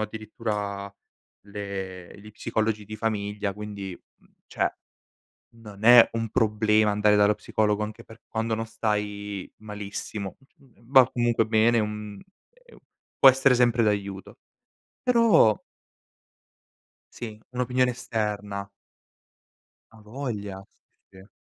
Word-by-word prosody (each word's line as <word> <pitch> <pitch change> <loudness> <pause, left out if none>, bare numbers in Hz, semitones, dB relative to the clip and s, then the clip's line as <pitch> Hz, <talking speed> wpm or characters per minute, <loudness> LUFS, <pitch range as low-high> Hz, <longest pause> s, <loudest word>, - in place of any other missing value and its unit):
addirittura 105 -2 -4 0.5
le 100 -3 -7
gli 105 +1 -13
psicologi 110 0 -2
di 110 +1 -8
famiglia, 105 -2 -2
quindi, 100 -3 -7 0.2
mhmm, - - -29 0.2
cioè, - - 0 0.9
non 105 -2 -12
è 120 0 +9
un 115 -1 -2
problema 105 -1 +2
andare 105 0 +3
dallo 105 +1 +4
psicologo 105 -1 0
anche 105 0 -7
per 115 +1 -15
quando 110 0 -1
non 115 +1 -3
stai 105 -3 -3
malissimo. 105 -2 -6 0.2
Mhmm, 120 -3 -24
va 130 -2 +8
comunque 120 -2 +1
bene, 110 +1 +3
è - - +2
un 105 -1 -5 0.3
è - - -25
un - - -17 0.4
può 135 - +9
essere 135 0 +4
sempre 120 -1 +3
d'aiuto. 100 -2 -2 0.6
Però 230 - +4 1.5
Sì, 110 -3 -8
un'opinione 125 0 +1
esterna. 105 -4 -4 1.2
Avoglia. 105 -3 -6 0.5
Sì, 95 - -18
sì. 95 +3 -17
105 Hz, 115 wpm, -26 LUFS, 105-115 Hz, 1.5 s, è